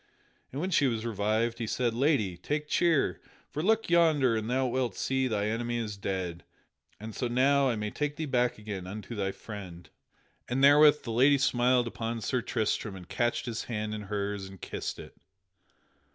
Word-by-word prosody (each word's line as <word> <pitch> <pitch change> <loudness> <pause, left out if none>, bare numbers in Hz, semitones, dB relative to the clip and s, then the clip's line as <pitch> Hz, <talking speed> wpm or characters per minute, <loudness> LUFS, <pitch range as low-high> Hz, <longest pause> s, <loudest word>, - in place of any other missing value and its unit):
And 135 - -5
when 185 +4 -2
she 145 -5 +4
was 115 -2 -2
revived, 110 +2 0
he 115 - -2
said: 120 +1 0
"Lady, 120 - +1
take 150 - -3
cheer; 155 - +2 0.3
for 150 - -3
look 220 +5 +2
yonder 155 -8 +4
and 110 +1 -2
thou 130 +1 +1
wilt 125 -4 -1
see 130 0 0
thy 105 -4 -1
enemy 120 +2 -1
is 110 -3 -3
dead, 95 -3 -4 0.6
and 110 +1 -7
so 125 - -2
now 135 +3 +3
I 120 - 0
may 105 -1 -3
take 150 -1 -2
thee 160 - -3
back 125 -3 +1
again 105 -4 -6
unto 105 +3 -7
thy 100 -3 -1
friend." 95 -5 -9 0.6
And 130 +2 0
therewith 150 +1 +7
the 115 - -4
lady 135 +5 +5
smiled 125 -2 +3
upon 115 0 -4
Sir 125 +3 0
Tristram 110 -3 -1
and 90 -2 -10
catched 120 +3 -1
his 115 -2 -4
hand 110 -2 -3
in 105 - -4
hers 100 -1 -2
and 95 -1 -13
kissed - - -5
it. - - -11
120 Hz, 185 wpm, -29 LUFS, 105-135 Hz, 0.6 s, therewith